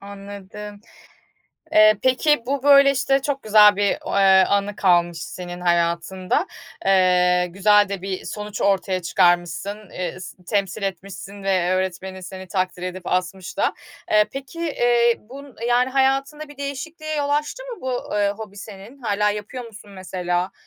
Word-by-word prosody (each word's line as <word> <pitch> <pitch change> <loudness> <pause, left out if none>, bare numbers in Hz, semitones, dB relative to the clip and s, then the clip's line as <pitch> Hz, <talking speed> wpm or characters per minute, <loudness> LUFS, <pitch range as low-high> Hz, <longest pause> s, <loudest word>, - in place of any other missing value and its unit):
Anladım. 200 +1 -10 0.9
Eee, 215 -1 +6
peki 260 +1 +2
bu, 275 +1 -2
böyle, 280 -1 +7
işte, 270 0 +1
çok 275 0 -3
güzel 210 -1 +6
bir 205 0 +1
o - - -3
eee, 190 -1 +6
anı 200 0 0
kalmış 175 -3 +2
senin 180 -1 -8
hayatında. 175 - 0 0.4
Eee, 180 -2 +3
güzel 205 +2 +4
de 200 -2 -4
bir 190 -1 -5
sonuç 210 -1 -6
ortaya 190 -2 +1
çıkarmışsın, 175 +4 0
eee, 180 0 -5
s 185 0 -11
temsil 200 +2 -2
etmişsin 195 +1 -6
ve 185 -2 +1
öğretmenin 185 0 -3
seni 190 +1 -9
takdir 185 -1 -2
edip 185 0 -6
asmış 185 0 -3
da. - - +1 0.4
Eee, 210 0 +5
peki, 275 +4 -8
eee, 240 -7 +2
bun 270 +4 -12
yani, 245 +1 +2
hayatında 275 +3 0
bir 290 -1 -14
değişikliğe 310 +3 -5
yol 290 -1 -1
açtı 300 +12 -1
mı - - -9
bu, 255 -4 -3
eee, 205 -1 +2
hobi 210 -2 -9
senin? 205 +4 -11
Hâlâ 210 -2 +1
yapıyor 210 +5 -6
musun 215 -2 -13
mesela, 185 -1 -3
200 Hz, 150 wpm, -22 LUFS, 185-250 Hz, 0.9 s, böyle